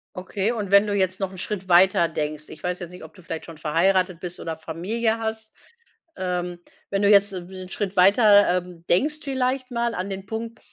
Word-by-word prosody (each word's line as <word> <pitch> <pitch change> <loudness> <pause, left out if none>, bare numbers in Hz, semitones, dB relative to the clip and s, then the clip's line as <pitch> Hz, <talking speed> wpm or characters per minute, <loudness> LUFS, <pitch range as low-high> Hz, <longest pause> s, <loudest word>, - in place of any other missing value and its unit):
Okay 190 +3 -2
und 210 -5 -4
wenn 200 +1 +7
du 205 - -1
jetzt 190 -1 0
noch 190 -1 -1
'n 190 - -11
Schritt 190 -1 -5
weiter 175 -1 +5
denkst. 155 -1 -4
Ich 155 - -11
weiß 180 +1 -3
jetzt 175 -1 -7
nicht, 180 - -11
ob 160 - -15
du 185 - -16
vielleicht 165 -1 -6
schon 165 -2 -11
verheiratet 180 +3 +1
bist 180 -1 -6
oder 160 -1 -5
Familie 220 +9 -2
hast, 220 -1 -5 0.6
ähm. 180 -1 -3 0.3
Wenn 195 - 0
du 200 - +4
jetzt 200 -1 +5
'n 180 -1 -7
w 185 -1 -8
Schritt 200 -1 -4
weiter, 205 +2 +6
ähm 175 -2 -10
denkst 300 - +2
vielleicht 260 -1 -1
mal 235 -1 -1
an 185 +2 -4
den 195 0 -6
Punkt, 225 +2 -5
190 Hz, 215 wpm, -24 LUFS, 175-215 Hz, 0.6 s, wenn